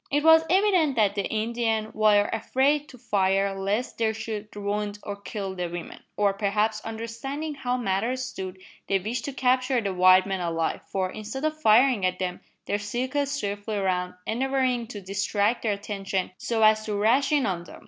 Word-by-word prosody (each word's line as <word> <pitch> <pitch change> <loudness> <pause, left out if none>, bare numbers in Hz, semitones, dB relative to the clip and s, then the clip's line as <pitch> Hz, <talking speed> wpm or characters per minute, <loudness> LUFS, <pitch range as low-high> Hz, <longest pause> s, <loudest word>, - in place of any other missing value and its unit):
It 290 +1 +1
was 320 0 +7
evident 365 -6 +3
that 210 -3 +3
the 200 -2 -2
Indians 220 0 -1
were 210 -1 +4
afraid 275 +6 +1
to 255 - -13
fire 195 -2 +1
lest 200 +6 -2
they 225 -1 +2
should 220 -1 -5
wound 205 0 -2
or 205 - -4
kill 200 0 -5
the 180 -2 -3
women; 175 0 -7 0.2
or, 205 -1 +3
perhaps, 210 +2 0
understanding 230 +7 -5
how 255 -3 -2
matters 240 +4 -1
stood, 190 -7 -6 0.3
they 195 - +2
wished 225 +6 -3
to 280 - -3
capture 255 0 +2
the 200 -4 -2
white 185 0 +6
men 195 -1 -2
alive, 165 -1 -1
for, 185 -1 -2
instead 220 +7 -5
of 310 0 -2
firing 235 -2 +5
at 185 0 +1
them, 180 -1 -3 0.3
they 205 - -1
circled 255 +7 -1
swiftly 205 -6 -3
round, 180 -2 -1
endeavouring 255 0 0
to 210 -3 -7
distract 200 +4 0
their 215 -3 +1
attention 195 -2 -3
so 225 -2 0
as 215 0 +5
to 210 - -2
rash 235 +8 +3
in 290 -3 +3
on 175 -3 -2
them. - - -12
215 Hz, 180 wpm, -26 LUFS, 195-255 Hz, 0.3 s, was